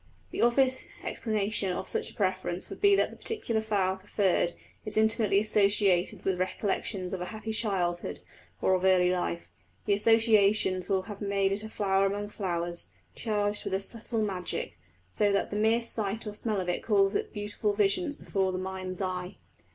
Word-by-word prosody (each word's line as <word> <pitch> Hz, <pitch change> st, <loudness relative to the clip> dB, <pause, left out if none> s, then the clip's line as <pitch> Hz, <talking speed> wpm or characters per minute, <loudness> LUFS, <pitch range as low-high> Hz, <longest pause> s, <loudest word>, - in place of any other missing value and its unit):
The -, -, -3 dB
obvious 255 Hz, +2 st, +3 dB, 0.2 s
explanation 210 Hz, -3 st, -1 dB
of -, -, -4 dB
such -, -, -2 dB
a -, -, -15 dB
preference 185 Hz, -2 st, -1 dB
would -, -, -8 dB
be 405 Hz, -1 st, +6 dB
that -, -, +1 dB
the -, -, -11 dB
particular 245 Hz, -, -2 dB
flower 195 Hz, -3 st, 0 dB
preferred 190 Hz, -3 st, +1 dB, 0.3 s
is 215 Hz, -1 st, -2 dB
intimately 220 Hz, -2 st, +3 dB
associated 200 Hz, -3 st, +2 dB
with 190 Hz, -2 st, 0 dB
recollections 185 Hz, 0 st, -2 dB
of 185 Hz, -, -3 dB
a -, -, -2 dB
happy 220 Hz, +2 st, -5 dB
childhood, 185 Hz, -6 st, -1 dB, 0.4 s
or 190 Hz, -, +4 dB
of 185 Hz, 0 st, +1 dB
early 185 Hz, -1 st, +4 dB
life. 85 Hz, -, -2 dB, 0.3 s
The -, -, +3 dB
associations 210 Hz, -3 st, +3 dB
will 190 Hz, -1 st, +1 dB
have 200 Hz, +1 st, -9 dB
made 200 Hz, -1 st, +1 dB
it 200 Hz, +1 st, +2 dB
a 220 Hz, -, -7 dB
flower 195 Hz, -2 st, +1 dB
among 205 Hz, +1 st, -3 dB
flowers, 175 Hz, -4 st, -3 dB, 0.2 s
charged 210 Hz, -2 st, 0 dB
with -, -, -1 dB
a -, -, 0 dB
subtle 225 Hz, +2 st, -2 dB
magic, 190 Hz, -4 st, -3 dB, 0.3 s
so 205 Hz, -, +1 dB
that 200 Hz, -, 0 dB
the -, -, -3 dB
mere 220 Hz, +3 st, +3 dB
sight 220 Hz, -2 st, -3 dB
or 210 Hz, -, -5 dB
smell 210 Hz, -1 st, -2 dB
of 180 Hz, -, -3 dB
it 180 Hz, -, -1 dB
calls 200 Hz, -3 st, +2 dB
up -, -, -1 dB
beautiful 210 Hz, 0 st, -2 dB
visions 215 Hz, -, +1 dB
before 190 Hz, -1 st, -1 dB
the 185 Hz, -, -3 dB
mind's 185 Hz, 0 st, -4 dB
eye. 180 Hz, 0 st, -3 dB
200 Hz, 180 wpm, -29 LUFS, 185-215 Hz, 0.4 s, be